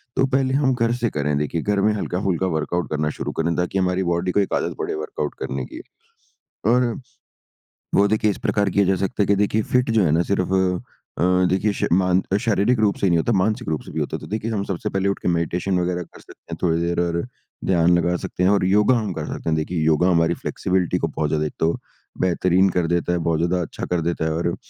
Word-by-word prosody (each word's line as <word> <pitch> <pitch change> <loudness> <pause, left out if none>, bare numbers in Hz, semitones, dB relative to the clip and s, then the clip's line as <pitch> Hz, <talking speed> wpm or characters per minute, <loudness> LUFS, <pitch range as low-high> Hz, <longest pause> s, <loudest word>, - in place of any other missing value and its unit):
तो 135 - +3
पहले 135 0 +1
हम 135 -2 +2
घर 115 -1 +1
से 120 -2 +1
करें 75 0 -1
देखिए 75 +3 -1
घर 100 +1 0
में 105 +1 +3
हल्का-फुल्का 95 -2 -1
वर्कआउट 85 +1 -2
करना 75 0 -1
शुरू - - -3
करें 85 +1 +1
ताकि 90 +2 -1
हमारी 90 0 +1
बॉडी 85 +1 0
को 100 - +1
एक 100 - 0
आदत - - -1
पड़े - - -2
वर्कआउट 75 -1 -4
करने 65 -1 -3
की। - - -9 0.9
और, 120 +1 +2 1.0
वो 100 +1 +5
देखिए 110 0 +2
इस - - -6
प्रकार 100 -1 +1
किया 100 +2 +2
जा 95 +1 +2
सकता 100 +2 -1
है - - -2
की 100 - +4
देखिए 105 +2 +1
फिट 125 0 +3
जो 110 -3 +3
है 75 - +2
ना 80 +2 +3
सिर्फ 95 -1 0 0.7
अ, 85 - +2 0.3
देखिए 95 +3 +1
समान 90 +1 +2 0.2
शारीरिक 115 +1 +1
रूप 105 -2 +2
से - - -1
ही 95 - +4
नहीं 85 - +3
होता, 115 - 0
मानसिक 105 0 0
रूप 80 - -1
से - - -10
भी - - -3
होता - - -2
है। - - -5
तो - - -9
देखिए 110 +2 -3
हम 100 -3 -1
सबसे 95 -3 -3
पहले 95 0 0
उठ 100 - -2
के - - -3
मेडिटेशन 90 +2 0
वगैरह 90 0 -1
कर - - -17
सकते - - -16
हैं - - -4
थोड़ी 85 -2 +2
देर 85 0 -1
और 85 -1 0 0.4
ध्यान 85 -1 +4
लगा 85 +1 +1
सकते 90 - -4
हैं 95 - +4
और 100 -2 +3
योगा 105 +6 +4
हम 105 -4 -2
कर 80 -2 -4
सकते - - -4
हैं। 80 - +2
देखिए 80 +1 -2
योगा 80 +3 +3
हमारी 85 -1 +3
फ्लैक्सिबिलिटी 90 -1 0
को 80 - -1
बहुत 75 -1 -2
ज्यादा 75 0 0
एक 75 - -4
तो 80 - +3 0.5
बेहतरीन 90 +1 +3
कर 90 -2 0
देता 85 +1 0
है, - - +1
बहुत 80 -1 0
ज़्यादा 90 +2 +1
अच्छा 85 - -5
कर 90 -2 -1
देता 85 -1 -1
है। 80 - 0
और 85 +1 -1
90 Hz, 245 wpm, -22 LUFS, 85-100 Hz, 1.0 s, वो